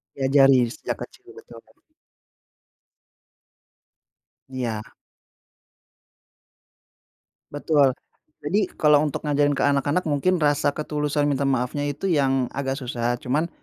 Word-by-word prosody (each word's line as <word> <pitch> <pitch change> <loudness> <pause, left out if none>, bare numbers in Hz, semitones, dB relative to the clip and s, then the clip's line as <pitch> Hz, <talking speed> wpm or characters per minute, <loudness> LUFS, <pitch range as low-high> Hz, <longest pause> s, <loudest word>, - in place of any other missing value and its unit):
Diajarin 135 -3 +4
sejak - - -5
kecil, 395 +2 -15
betul 445 +1 -13
banget. - - -27 2.7
Iya. 115 -5 -4 2.7
Betul. 145 -3 +2 0.5
Jadi 195 +4 0
kalau 150 -1 +4
untuk 150 +1 -4
ngajarin 145 -1 +1
ke - - 0
anak-anak 145 +5 +1
mungkin 155 +5 +1
rasa 145 -2 +2
ketulusan 150 -1 -2
minta 140 0 0
maafnya 130 +1 -1
itu 145 +7 -5
yang 135 -5 +2
agak 135 0 -3
susah, 120 -2 -2
cuma 150 +8 -2
145 Hz, 100 wpm, -23 LUFS, 130-150 Hz, 2.7 s, Diajarin